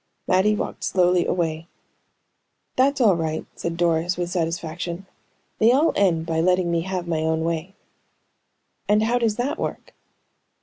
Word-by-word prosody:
Mattie 190 +3 +3
walked - - -5
slowly 180 -1 +2
away. 165 -2 -1 1.1
"That's 275 +2 +2
all 215 -7 +5
right," 160 -1 -3
said 170 0 -4
Doris, 170 +1 +1
with 175 0 -3
satisfaction. 170 +1 -3 0.5
"They 225 +2 +5
all 285 +6 +3
end 170 -5 +2
by 160 -1 0
letting 180 0 +2
me 170 -1 +1
have 180 0 -4
my 165 -2 0
own 160 0 0
way." 170 +3 -3 1.1
"And 210 +1 +4
how 240 +2 +1
does 225 -3 +1
that 250 +5 -2
work?" - - -5
175 Hz, 145 wpm, -23 LUFS, 165-200 Hz, 1.1 s, all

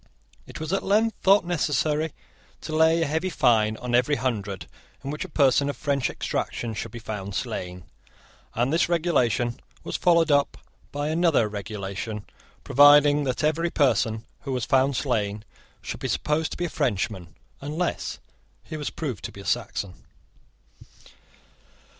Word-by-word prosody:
It - - -9
was 155 +3 -3
at 195 - +1
length 215 +2 +2
thought 195 0 +5
necessary 155 -2 0 0.5
to 155 - -5
lay 160 +1 +4
a - - +1
heavy 160 +5 -1
fine 110 -8 +2
on 125 -1 -5
every 125 +4 +3
Hundred 105 -6 -3 0.4
in 140 - -4
which 150 - -4
a - - -8
person 140 0 +3
of 145 - -4
French 140 -5 0
extraction 115 -2 -3
should 115 - -5
be 120 - -9
found 105 -3 -6
slain; 90 -1 -4 0.7
and 125 +5 +1
this 170 - +2
regulation 125 -9 +1 0.2
was - - -3
followed 170 -3 +3
up 145 -1 +2 0.3
by 145 +1 -2
another 160 -8 +3
regulation, 105 0 -5 0.4
providing 145 +1 +6
that 130 +2 -2
every 160 +3 +1
person 115 -7 +1
who 140 - -6
was 125 -3 -1
found 135 +1 +3
slain 105 -5 -1 0.4
should - - -5
be - - -3
supposed 155 +1 0
to - - -7
be 175 - -1
a - - -3
Frenchman, 95 - -2 0.3
unless 155 +5 -2 0.5
he 155 - -7
was 150 - -3
proved 130 - -5
to - - -5
be 100 - -11
a - - -12
Saxon. 100 -5 -2
140 Hz, 155 wpm, -25 LUFS, 110-155 Hz, 0.7 s, providing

